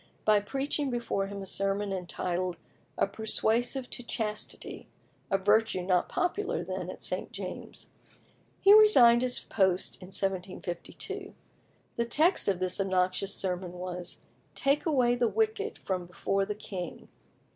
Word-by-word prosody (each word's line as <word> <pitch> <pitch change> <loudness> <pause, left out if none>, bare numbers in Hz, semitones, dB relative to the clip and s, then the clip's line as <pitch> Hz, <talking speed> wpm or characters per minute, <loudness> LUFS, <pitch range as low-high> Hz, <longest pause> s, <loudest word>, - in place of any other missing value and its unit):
by 215 -1 +5
preaching 275 +6 -2
before 235 -5 -1
him 200 0 -6
a - - -7
sermon 195 +1 -1
entitled 180 -1 -3 0.4
"A - - +3
Persuasive 225 +5 0
to - - -1
Chastity" 215 -3 -4 0.4
a 195 - +3
virtue 205 -1 +2
not 180 -1 +1
popular 365 +3 -1
then - - -4
at - - -6
St. - - -2
James's. - - -7 0.7
He 400 +1 +7
resigned 260 - +8
his 250 -1 +3
post 190 -1 0
in 180 - -9
1752. 185 -2 -4 0.6
The 235 - +1
text 315 +10 +3
of 190 -3 +1
this 185 +1 0
obnoxious 190 +1 0
sermon 180 -1 -3
was, 180 0 -5 0.3
"Take 280 +4 +1
away 255 -6 +3
the 240 -1 +2
wicked 435 - -1
from 185 -2 -3
before 195 +2 -1
the 210 +1 -4
king." 185 -5 -7
200 Hz, 135 wpm, -29 LUFS, 185-245 Hz, 0.7 s, resigned